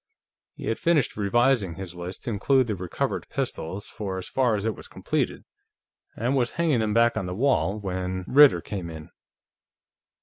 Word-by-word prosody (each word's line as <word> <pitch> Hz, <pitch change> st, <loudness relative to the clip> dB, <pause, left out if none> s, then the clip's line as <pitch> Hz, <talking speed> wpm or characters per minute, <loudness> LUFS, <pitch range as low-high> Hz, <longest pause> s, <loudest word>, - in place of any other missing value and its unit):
He -, -, -8 dB
had 115 Hz, -, -1 dB
finished 165 Hz, -6 st, +2 dB
revising 105 Hz, -2 st, +2 dB
his 95 Hz, -1 st, -7 dB
list 90 Hz, +1 st, -7 dB
to 120 Hz, -, -3 dB
include 130 Hz, +5 st, +3 dB
the 110 Hz, -3 st, -2 dB
recovered 90 Hz, -1 st, -3 dB
pistols 95 Hz, +6 st, -4 dB
for 100 Hz, -4 st, -5 dB
as 95 Hz, -, -6 dB
far 125 Hz, -4 st, +2 dB
as 100 Hz, 0 st, -3 dB
it 110 Hz, -2 st, 0 dB
was -, -, -9 dB
completed, -, -, -2 dB, 0.7 s
and 125 Hz, +5 st, 0 dB
was 120 Hz, -3 st, +1 dB
hanging 160 Hz, -7 st, +1 dB
them 110 Hz, -1 st, 0 dB
back 115 Hz, 0 st, +4 dB
on 95 Hz, -, -2 dB
the 90 Hz, -, -4 dB
wall 105 Hz, -, +1 dB
when 95 Hz, -1 st, -3 dB
Ritter 145 Hz, +1 st, +7 dB
came 95 Hz, -5 st, -5 dB
in. 80 Hz, -1 st, -9 dB
105 Hz, 175 wpm, -25 LUFS, 95-120 Hz, 0.7 s, Ritter